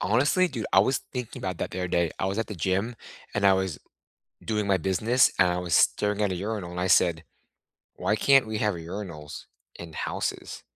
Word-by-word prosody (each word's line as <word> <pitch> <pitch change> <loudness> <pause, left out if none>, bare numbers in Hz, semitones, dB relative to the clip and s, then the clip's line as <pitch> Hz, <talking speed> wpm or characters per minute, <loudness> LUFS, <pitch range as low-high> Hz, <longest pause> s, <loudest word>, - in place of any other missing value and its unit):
Honestly, 145 - +2
dude, 120 -7 -4
I 95 - +6
was 130 +6 +2
thinking 125 -3 -5
about 90 -3 -4
that - - -3
the 95 - -6
other 90 -1 -2
day. 85 -2 +1
I - - -1
was 100 +3 -2
at 115 - -1
the 105 - -7
gym, 95 +7 -1 0.4
and 105 -1 0
I 95 - +7
was 95 -5 -1 0.7
doing 105 -2 -1
my 95 -1 +3
business, 110 +8 +2
and 90 - +5
I 90 0 0
was 90 -2 -1
staring 105 0 +2
at 100 - +1
a 90 - -3
urinal, 100 -2 -4
and 90 0 -5
I 90 - 0
said, 85 -3 +3 0.7
"Why 105 - -1
can't 135 +3 +5
we 110 -1 -3
have 105 -1 +1
urinals 85 -3 -7 0.3
in 80 -2 -10
houses?" - - -4
95 Hz, 210 wpm, -26 LUFS, 90-110 Hz, 0.7 s, I